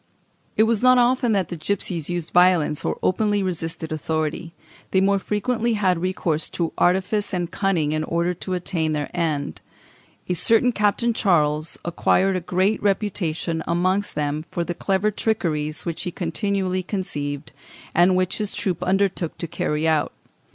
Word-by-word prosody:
It 220 - +6
was 225 -1 +2
not 255 0 +6
often 245 0 +3
that 190 -4 0
the 175 - -4
gipsies 170 -1 -2
used 175 -2 -3
violence 175 -4 +4
or - - -1
openly 205 +1 +2
resisted 165 -3 -3
authority; 155 +2 -2 0.4
they 190 - +3
more 200 +1 +3
frequently 230 +3 -1
had 185 -5 +1
recourse 175 -4 -1
to 170 -2 -1
artifice 190 +3 +1
and 175 -1 -2
cunning 180 -7 0
in 155 0 0
order 170 +2 0
to 185 +1 -4
attain 165 -3 -1
their 150 -1 -3
end. 150 - -2 0.7
A 180 - 0
certain 225 +8 +3
Captain 220 +2 +1
Charles 155 -6 +1
acquired 190 +2 +2
a - - +1
great 185 +5 +1
reputation 180 -5 -1
amongst 185 +4 +1
them 150 +1 -2
for 175 - -2
the 175 - -3
clever 195 +4 0
trickeries 155 -9 -1
which 170 -2 -3
he - - -2
continually 185 +2 -1
conceived, 145 -7 -4 0.4
and 175 +2 +4
which 185 +2 0
his 210 -1 -2
troop 185 -4 -2
undertook 190 -3 0
to - - -3
carry 155 -1 -1
out. 155 -1 +2
180 Hz, 160 wpm, -23 LUFS, 160-200 Hz, 0.7 s, It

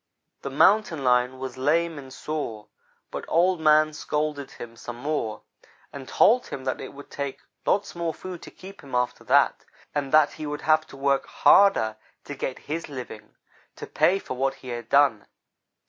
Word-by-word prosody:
"The - - -4
Mountain 160 +1 +3
lion 125 0 +2
was 130 -1 -6
lame 160 +3 +1
and 135 -1 -11
sore, 130 -9 -5 0.5
but - - -5
Old 175 +2 +3
man 155 0 +4
scolded 150 -1 -2
him 115 -1 -10
some 120 +1 -8
more 125 -4 -3 0.5
and 135 -2 -8
told 245 +3 +4
him 130 - -6
that 130 -1 -2
it - - -7
would 140 - -12
take 140 -1 -5 0.3
lots 205 - +1
more 170 -1 -2
food 180 +1 -8
to - - -10
keep 195 +1 -13
him 135 -3 -7
after 125 0 -1
that, - - +3 0.3
and 140 -2 -2
that 155 -1 +5
he 155 - -6
would 145 0 -4
have 155 0 +3
to - - -12
work 140 0 +1
harder 110 - +4 0.3
to - - -7
get 135 -2 -4
his 155 +2 -4
living, 125 -6 -9 0.4
to - - -7
pay 190 - +2
for 195 - -6
what 135 +1 0
he 130 - -11
had 120 -1 -6
done. 140 -7 +3
140 Hz, 180 wpm, -25 LUFS, 130-155 Hz, 0.5 s, that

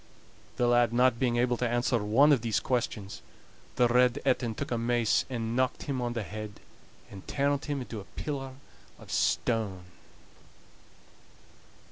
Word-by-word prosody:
The 125 - +1
lad 120 -1 +4
not 125 -1 +3
being 120 -2 +1
able 120 0 +2
to 125 0 0
answer 120 0 +1
one 130 +9 +5
of 135 -6 +4
these 115 -2 0
questions, 110 -5 -3 0.5
the 120 - +4
Red 125 0 +3
Etin 125 -4 +1
took - - -5
a 120 - +1
mace 120 -1 +1
and 115 -2 -3
knocked 130 0 0
him 135 -3 -3
on 120 -1 -2
the 115 -2 -3
head, 105 +1 -7 0.5
and 95 -1 -11
turned 140 0 0
him 145 -3 -2
into 115 -3 -6
a 100 - -10
pillar 135 -3 -4 0.4
of - - -13
stone. 105 -6 0
120 Hz, 155 wpm, -29 LUFS, 115-130 Hz, 0.5 s, one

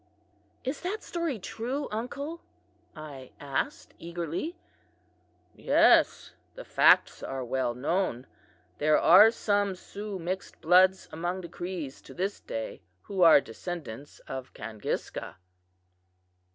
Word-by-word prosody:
"Is 265 +3 -3
that 390 +5 -3
story 335 -7 -2
true, 250 +8 -4
uncle?" 280 +9 -4 0.5
I 145 -5 -10
asked 140 -2 -3
eagerly. 170 - -4 1.0
"'Yes, - - +4 0.2
the - - -9
facts - - +4
are 135 -1 -4
well 120 -1 -1
known. 135 -1 -1 0.5
There 155 +1 +4
are 195 +6 +8
some 205 -3 0
Sioux 200 +2 -7
mixed 185 +2 -5
bloods 185 +3 +4
among 175 +3 -3
the 170 - -9
Crees 175 -6 -6
to - - -13
this 195 +3 -2
day 110 0 -6 0.2
who 195 -2 -3
are 165 -4 +9
descendants 145 0 -7
of 130 -1 -7
Kangiska." 110 -5 -5
180 Hz, 110 wpm, -28 LUFS, 145-210 Hz, 1.0 s, are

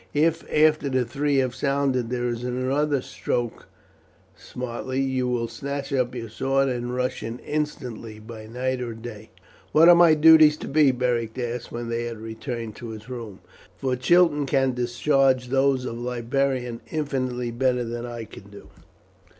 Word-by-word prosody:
If 165 +2 +1
after 155 -1 +3
the 130 -2 +1
three 140 +5 -1
have 130 -2 +1
sounded 135 -2 0
there 125 0 -1
is 120 0 -3
another 130 +3 0
struck 120 -2 -3 0.7
smartly, 125 +1 -5
you 130 -2 0
will 120 -2 -1
snatch 140 +1 -5
up 125 -2 0
your 115 -2 -5
sword 135 +4 0
and 120 0 -3
rush 125 0 -2
in 115 +1 -5
instantly 125 -7 -4
by 110 0 -10
night 125 +2 -2
or 120 -2 -4
day." 110 -2 -9 0.4
"What 160 +2 +7
are - - +10
my 170 -2 +6
duties 155 -1 +7
to - - -7
be?" 150 0 +4
Beric 120 -2 -1
asked 120 -1 -4
when 120 0 -5
they 115 0 -2
had 115 -1 -5
returned 115 0 -6
to 120 - -7
his 110 +1 -9
room, 115 -6 -7 0.4
"for 130 -1 -1
Chiton 150 +1 +3
can 135 -1 +2
discharge 125 +1 +1
those 135 -1 +2
of 115 -1 -5
librarian 125 0 -1
infinitely 130 -5 -2
better 125 +1 +1
than 120 +1 -5
I 120 -1 -6
can 100 -2 -13
do." 100 - -13
125 Hz, 165 wpm, -24 LUFS, 120-135 Hz, 0.7 s, are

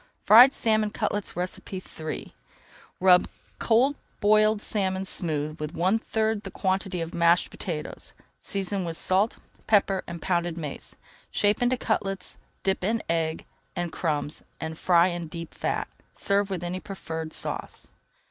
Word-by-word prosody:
FRIED 245 +5 +9
SALMON 215 -4 +2
CUTLETS 205 -1 -2 0.6
III 155 0 -5 0.7
Rub 180 -1 +6 0.3
cold 250 +5 +3 0.2
boiled 215 +1 +4
salmon 190 -2 0
smooth 155 -4 -2
with 150 +2 -5
one 190 +6 +2
third 220 -1 0
the - - -7
quantity 190 -2 -1
of 165 +1 -5
mashed 170 +1 +3
potatoes. 160 -6 -6 0.2
Season 195 -1 -2
with 165 -1 -3
salt, 195 +4 +1 0.3
pepper, 195 -3 +3
and 170 -1 -6
pounded 175 -1 -1
mace. 150 -4 -6 0.3
Shape 205 +2 +2
into 245 +1 +2
cutlets, 195 -5 -2 0.2
dip 190 -1 0
in 220 +3 0
egg 165 -1 -1 0.3
and 175 -1 -2
crumbs 150 -2 -2 0.2
and 160 0 -4
fry 175 +1 +4
in 175 -2 -4
deep 165 +1 -7
fat. - - -2 0.3
Serve 200 0 +1
with 185 -3 -3
any 175 +1 -3
preferred 160 -5 -6
sauce. - - -4
185 Hz, 140 wpm, -26 LUFS, 170-210 Hz, 0.7 s, FRIED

